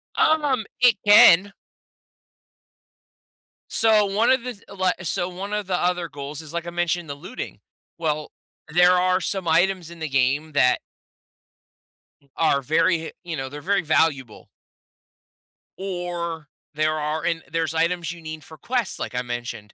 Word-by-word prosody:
Um, 290 Hz, -7 st, +2 dB, 0.2 s
it 245 Hz, -3 st, +6 dB
can. 200 Hz, -2 st, +7 dB, 2.2 s
So 215 Hz, -2 st, +3 dB
one 215 Hz, +5 st, +2 dB
of 260 Hz, -, +3 dB
this 245 Hz, -5 st, -7 dB
li 185 Hz, -1 st, +2 dB
so 175 Hz, +1 st, -1 dB
one 195 Hz, +3 st, -6 dB
of 210 Hz, -2 st, -2 dB
the 180 Hz, -, 0 dB
other 175 Hz, -1 st, -1 dB
goals 145 Hz, +1 st, -7 dB
is, 155 Hz, 0 st, -12 dB
like 170 Hz, 0 st, -3 dB
I 170 Hz, -, -5 dB
mentioned, 175 Hz, -1 st, -1 dB
the -, -, -3 dB
looting. 185 Hz, -, -8 dB, 0.4 s
Well, 155 Hz, -2 st, -2 dB, 0.4 s
there 180 Hz, +1 st, +6 dB
are 185 Hz, +1 st, +2 dB
some 190 Hz, -1 st, -3 dB
items 175 Hz, +1 st, +2 dB
in 170 Hz, -, -12 dB
the 155 Hz, -, -4 dB
game 140 Hz, +4 st, +1 dB
that 125 Hz, -3 st, +3 dB, 1.4 s
mm 140 Hz, -, -30 dB
are 150 Hz, -4 st, +2 dB
very 165 Hz, +6 st, +2 dB
he 160 Hz, 0 st, -7 dB
you 170 Hz, -2 st, -5 dB
know, 135 Hz, -, -4 dB
they're 145 Hz, -, -8 dB
very 200 Hz, +2 st, +1 dB
valuable. 150 Hz, -7 st, 0 dB, 1.3 s
Or 175 Hz, -4 st, -4 dB, 0.3 s
there 155 Hz, 0 st, 0 dB
are 150 Hz, +1 st, -2 dB
and 165 Hz, -1 st, -1 dB
there's 165 Hz, -1 st, -1 dB
items 170 Hz, +1 st, 0 dB
you 170 Hz, -, -10 dB
need 155 Hz, -1 st, -8 dB
for 160 Hz, -, -13 dB
quests, 240 Hz, -1 st, -2 dB
like -, -, -5 dB
I 125 Hz, -, 0 dB
mentioned. 120 Hz, -4 st, -6 dB
170 Hz, 155 wpm, -23 LUFS, 155-190 Hz, 2.2 s, can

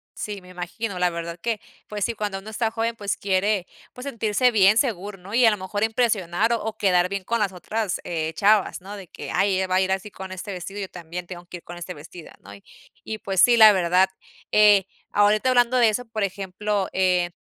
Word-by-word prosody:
Sí, 205 Hz, -2 st, -5 dB
me 180 Hz, -, -16 dB
imagino, 180 Hz, +3 st, -5 dB
la 180 Hz, -, +3 dB
verdad 170 Hz, 0 st, -6 dB
que, 225 Hz, +2 st, -2 dB, 0.3 s
pues 210 Hz, -2 st, -2 dB
sí, 235 Hz, -, -2 dB
cuando 205 Hz, -3 st, -3 dB
uno 200 Hz, +3 st, -9 dB
está 225 Hz, +1 st, 0 dB
joven, 230 Hz, +1 st, -2 dB
pues 205 Hz, -3 st, -3 dB
quiere 195 Hz, 0 st, 0 dB, 0.3 s
pues 250 Hz, -, -9 dB
sentirse 230 Hz, -1 st, +1 dB
bien 210 Hz, -1 st, +5 dB
seguro, 205 Hz, -6 st, -1 dB
¿no? 190 Hz, +3 st, -12 dB
Y 245 Hz, +2 st, +4 dB
a 225 Hz, -, +8 dB
lo 210 Hz, -, -1 dB
mejor 205 Hz, +2 st, -3 dB
impresionar, 220 Hz, -3 st, +1 dB
o, 220 Hz, -1 st, -3 dB
quedar 180 Hz, -3 st, +2 dB
bien 200 Hz, 0 st, -3 dB
con 235 Hz, +5 st, -1 dB
las 205 Hz, -3 st, +1 dB
otras, 200 Hz, +2 st, -3 dB
eh, 160 Hz, -2 st, -2 dB
chavas, 205 Hz, 0 st, +3 dB
¿no? 200 Hz, +3 st, -8 dB
De 195 Hz, -3 st, -10 dB
que, -, -, -8 dB
ay, 195 Hz, -1 st, +2 dB
ella 190 Hz, 0 st, 0 dB
va 185 Hz, -, 0 dB
a 185 Hz, -, +4 dB
ir 190 Hz, 0 st, 0 dB
así 195 Hz, +2 st, -2 dB
con 190 Hz, 0 st, -9 dB
este 190 Hz, +2 st, -6 dB
vestido, 190 Hz, +3 st, -7 dB
y -, -, -3 dB
yo 190 Hz, -, -7 dB
también 175 Hz, 0 st, -7 dB
tengo 175 Hz, -1 st, -9 dB
que 180 Hz, -, -8 dB
ir 170 Hz, -, -16 dB
con 175 Hz, -, -9 dB
este 175 Hz, +1 st, -7 dB
vestido, 160 Hz, +3 st, -12 dB
¿no? 100 Hz, -, -13 dB, 0.5 s
Y, 220 Hz, -, -5 dB
pues 190 Hz, -3 st, 0 dB
sí, 240 Hz, -1 st, +6 dB
la 215 Hz, -2 st, +9 dB
verdad, 180 Hz, 0 st, +3 dB, 0.4 s
eh, 210 Hz, -2 st, +6 dB, 0.2 s
ahorita 210 Hz, +4 st, +3 dB
hablando 245 Hz, 0 st, +3 dB
de 235 Hz, -2 st, +5 dB
eso, 245 Hz, +4 st, -2 dB
por 225 Hz, -2 st, -5 dB
ejemplo, 195 Hz, +1 st, -2 dB
eh, 180 Hz, -2 st, +2 dB
200 Hz, 230 wpm, -24 LUFS, 180-220 Hz, 0.5 s, la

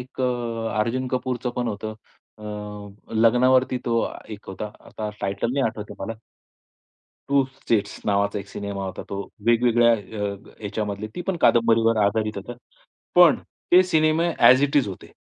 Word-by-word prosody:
एक 130 Hz, +1 st, -9 dB
अ, 115 Hz, -3 st, -2 dB
अर्जुन 120 Hz, +4 st, 0 dB
कपूरचंपण 125 Hz, -1 st, -2 dB
होतं 110 Hz, 0 st, -5 dB, 0.4 s
अ, 105 Hz, -1 st, -8 dB
लग्नावरती 125 Hz, +3 st, +4 dB
तो 115 Hz, -1 st, +2 dB
अ, -, -, -3 dB
एक 105 Hz, -2 st, -9 dB
होता. 100 Hz, +2 st, -5 dB
आता 105 Hz, -1 st, -6 dB
टायटल 100 Hz, +4 st, -1 dB
नाही 135 Hz, 0 st, +1 dB
आठवत 110 Hz, -2 st, -5 dB
मला. 110 Hz, +3 st, -5 dB, 1.1 s
2 140 Hz, -1 st, +4 dB, 0.2 s
स्टेट्स 105 Hz, -3 st, -1 dB
नावाचा 100 Hz, 0 st, +1 dB
एक 100 Hz, 0 st, -9 dB
सिनेमा 100 Hz, -1 st, -5 dB
होता 95 Hz, 0 st, -5 dB
तो. 100 Hz, -, -3 dB, 0.3 s
वेगवेगळ्या 120 Hz, 0 st, +4 dB
अ, 105 Hz, -2 st, -3 dB, 0.3 s
ह्याच्यामधली 105 Hz, 0 st, -3 dB
ती -, -, -5 dB
पण 190 Hz, -, 0 dB
कादंबरीवर 115 Hz, -1 st, +4 dB
आधारित 110 Hz, +1 st, 0 dB
होता. 100 Hz, +5 st, -6 dB, 0.6 s
पण 175 Hz, -4 st, +7 dB, 0.3 s
ते 180 Hz, +1 st, +9 dB
सिनेमे 160 Hz, -1 st, +2 dB
ॲज 130 Hz, +3 st, +7 dB
इट 145 Hz, +1 st, +1 dB
इज 130 Hz, -7 st, +3 dB
होते. 95 Hz, -, -9 dB
115 Hz, 150 wpm, -24 LUFS, 105-125 Hz, 1.1 s, ते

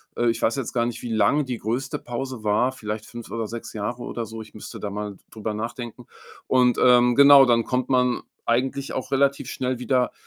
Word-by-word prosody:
Äh, 120 Hz, -, +1 dB
ich 115 Hz, -, -1 dB
weiß 115 Hz, -, +2 dB
jetzt 135 Hz, -4 st, -4 dB
gar 120 Hz, -1 st, +1 dB
nicht, 120 Hz, -, -4 dB
wie 120 Hz, -, -5 dB
lang 110 Hz, +8 st, +3 dB
die 125 Hz, -2 st, -3 dB
größte 125 Hz, +6 st, -3 dB
Pause 125 Hz, -1 st, -5 dB
war, 110 Hz, +5 st, +2 dB
vielleicht 110 Hz, -3 st, -5 dB
5 120 Hz, -1 st, -10 dB
oder 115 Hz, -1 st, -3 dB
6 115 Hz, +1 st, -7 dB
Jahre 110 Hz, +3 st, -4 dB
oder 115 Hz, -, -4 dB
so. 110 Hz, +1 st, -8 dB
Ich 110 Hz, -, -13 dB
müsste 105 Hz, -, -9 dB
da 105 Hz, -, -4 dB
mal 105 Hz, +1 st, -4 dB
d -, -, -25 dB
drüber 110 Hz, -1 st, -4 dB
nachdenken. 120 Hz, +2 st, -6 dB, 0.4 s
Und, 125 Hz, -2 st, +3 dB
ähm 125 Hz, -1 st, +5 dB
genau, 140 Hz, 0 st, +9 dB
dann 120 Hz, -2 st, +3 dB
kommt 125 Hz, +1 st, -2 dB
man 125 Hz, -2 st, +2 dB, 0.2 s
eigentlich 130 Hz, +3 st, 0 dB
auch 130 Hz, -, -4 dB
relativ 140 Hz, 0 st, +1 dB
schnell 130 Hz, -1 st, -2 dB
wieder 125 Hz, 0 st, +1 dB
120 Hz, 215 wpm, -24 LUFS, 115-130 Hz, 0.4 s, genau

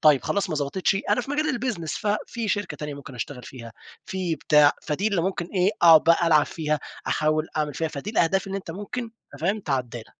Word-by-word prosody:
طيب 150 Hz, -4 st, +5 dB
خلاص 200 Hz, -2 st, -1 dB
ما 155 Hz, -, -1 dB
ظبطِتش، 165 Hz, +7 st, 0 dB
أنا 210 Hz, -, +3 dB
في 270 Hz, -, -8 dB
مجال 300 Hz, -3 st, 0 dB
الBusiness 195 Hz, -11 st, -3 dB
ففي 215 Hz, +1 st, -2 dB
شركة 205 Hz, +1 st, -2 dB
تانية 150 Hz, -1 st, -5 dB
ممكن 140 Hz, -1 st, -10 dB
أشتغل 125 Hz, +2 st, -6 dB
فيها، 115 Hz, -3 st, -10 dB, 0.3 s
في 185 Hz, -3 st, -2 dB
بتاع، 150 Hz, -1 st, +5 dB
فدي 175 Hz, +8 st, -1 dB
اللي 190 Hz, -5 st, 0 dB
ممكن 180 Hz, -2 st, -2 dB
إيه 185 Hz, +1 st, +1 dB
أقعُد 165 Hz, -2 st, +8 dB
بقى 170 Hz, +1 st, +4 dB
ألعب 155 Hz, -3 st, +5 dB
فيها، 155 Hz, -2 st, -1 dB, 0.3 s
أحاول 155 Hz, +1 st, +1 dB
أعمل 150 Hz, -2 st, -1 dB
فيها، 160 Hz, -, -1 dB
فدي 150 Hz, +7 st, -6 dB
الأهداف 195 Hz, -2 st, +2 dB
اللي 195 Hz, 0 st, -3 dB
أنت 185 Hz, -, -9 dB
ممكن 205 Hz, +7 st, -5 dB, 0.3 s
أنت 140 Hz, -, -12 dB
فاهم، 195 Hz, +6 st, 0 dB
تعدلها. 125 Hz, -, -4 dB
165 Hz, 205 wpm, -25 LUFS, 150-200 Hz, 0.3 s, أقعُد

